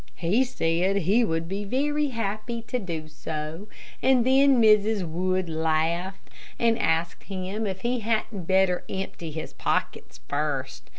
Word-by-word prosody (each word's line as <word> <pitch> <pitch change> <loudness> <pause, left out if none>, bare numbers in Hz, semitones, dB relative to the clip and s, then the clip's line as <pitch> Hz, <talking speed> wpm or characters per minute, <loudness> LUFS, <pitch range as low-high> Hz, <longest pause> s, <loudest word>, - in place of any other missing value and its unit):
He 195 +10 +2
said 185 -6 0
he 200 +5 +3
would 165 -5 -1
be 195 +3 -3
very 290 +7 0
happy 230 -1 -3
to 250 +2 -2
do 165 -6 -5
so, 155 +4 -6 0.3
and 255 -3 +4
then 270 0 +5
Mrs. 215 -3 +4
Wood 185 +2 -1
laughed; 165 +3 -1 0.3
and 230 -1 +2
asked 165 +1 0
him 195 +3 -3
if 190 -1 -4
he 245 +1 0
hadn't 220 -4 -2
better 190 -1 +3
empty 190 -3 -5
his 160 +1 -6
pockets - - -2
first. 135 -3 -3
190 Hz, 140 wpm, -26 LUFS, 165-225 Hz, 0.3 s, then